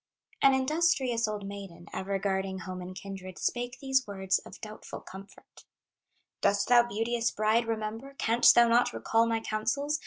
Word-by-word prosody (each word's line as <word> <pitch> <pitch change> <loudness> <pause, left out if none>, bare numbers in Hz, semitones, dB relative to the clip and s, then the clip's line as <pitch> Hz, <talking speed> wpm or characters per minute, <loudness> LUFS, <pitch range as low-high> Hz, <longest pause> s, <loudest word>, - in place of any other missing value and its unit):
An 270 -1 +6
industrious 265 -5 +1
old 210 -2 -4
maiden, 195 -4 -8
Ever 195 +1 -2
guarding 190 -1 -2
home 185 0 -6
and 180 +1 -8
kindred, 190 -2 -8
Spake 245 0 -2
these 265 -2 +1
words 190 -2 0
of - - -13
doubtful 215 0 -8
comfort: 195 +1 -14 0.8
"Dost 200 +2 +2
thou, 245 -1 +8
beauteous 230 +2 0
bride, 215 +2 +1
remember, 225 +5 -4
Canst 235 +2 +5
thou 235 0 +7
not 235 - +3
recall 225 - +1
my 225 -1 0
counsels? 275 +8 -1
220 Hz, 155 wpm, -29 LUFS, 195-240 Hz, 0.8 s, thou